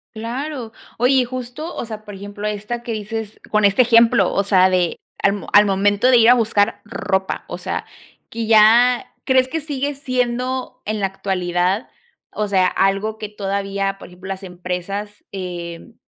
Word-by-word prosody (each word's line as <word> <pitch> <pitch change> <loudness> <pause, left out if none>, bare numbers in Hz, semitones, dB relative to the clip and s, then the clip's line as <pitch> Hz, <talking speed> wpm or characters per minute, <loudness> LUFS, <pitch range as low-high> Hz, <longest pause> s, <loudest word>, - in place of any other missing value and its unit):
Claro, 240 +2 -5 0.3
oye 250 +3 +3
y 255 -1 +4
justo, 255 +6 -6
o - - -4
sea, 215 -1 -8
por 205 -1 -9
ejemplo, 205 +2 -6
esta, 210 +3 -4
que 235 - -6
dices 215 0 -5
con 215 -1 +3
este 200 +5 +5
ejemplo, 230 -5 +4
o 200 - +1
sea, 190 -2 +4
de 180 -2 +1 0.2
al 200 - +4
m 205 - -6
al 205 +1 +8
momento 205 +3 +2
de 250 - +6
ir 230 0 +6
a 245 - +9
buscar 220 -3 +1
ropa, 190 -3 -2
o - - -5
sea, - - -4 0.4
que 225 -1 -4
ya, 230 +3 +5
¿crees 260 -1 +3
que 320 +4 -3
sigue 285 -1 -2
siendo 255 -1 -2
en 215 0 -2
la 195 - +1
actualidad, 185 +1 -1 0.4
o 210 -1 -2
sea, 190 -2 +3
algo 195 +4 0
que 215 - -5
todavía, 195 -1 -2
por - - -11
ejemplo, 180 +1 -12
las 195 0 -5
empresas, 185 +3 -5
eh, 175 +1 -7
210 Hz, 175 wpm, -20 LUFS, 195-240 Hz, 0.4 s, a